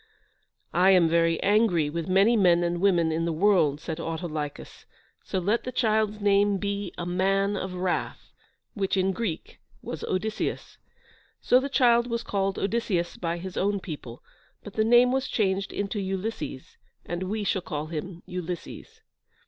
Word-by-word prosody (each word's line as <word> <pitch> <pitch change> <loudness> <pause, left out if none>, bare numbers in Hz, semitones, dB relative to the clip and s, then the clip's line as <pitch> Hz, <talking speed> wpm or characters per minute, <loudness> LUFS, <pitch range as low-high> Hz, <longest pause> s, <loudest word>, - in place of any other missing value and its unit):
"I 180 +2 +4
am 180 -3 +6
very 165 0 +2
angry 200 -6 +3
with 165 +2 -4
many 195 +5 +4
men 175 -5 +4
and 175 0 -1
women 175 -5 +3
in 165 +1 -1
the 170 - 0
world," 160 -4 +3
said 160 +1 -5
Autolycus, 160 -3 -5 0.4
"so - - -3
let 205 +6 0
the 255 - -4
child's 215 -3 +1
name 205 0 +3
be 200 -1 -3
A 175 - -4
Man 195 +3 +1
of 190 -1 -4
Wrath," 180 0 -3 0.4
which, 195 -2 -1
in 190 +1 +2
Greek, 190 -5 -4 0.2
was - - -6
Odysseus. 215 +4 -3 0.6
So 250 - +4
the 275 +2 -3
child 240 -3 +4
was 235 -1 -2
called 195 -1 -1
Odysseus 195 -5 -1
by 170 -1 -3
his 185 +1 -7
own 200 +1 +1
people, 145 - -8 0.4
but 205 - -9
the 220 - +1
name 240 +2 +5
was 265 +1 0
changed 195 -2 0
into 200 +1 -3
Ulysses, 190 -7 -5 0.3
and 175 0 -4
we 205 +3 -2
shall 195 -1 0
call 150 -3 -4
him 170 +3 -6
Ulysses. 180 - -7
190 Hz, 160 wpm, -26 LUFS, 170-210 Hz, 0.6 s, am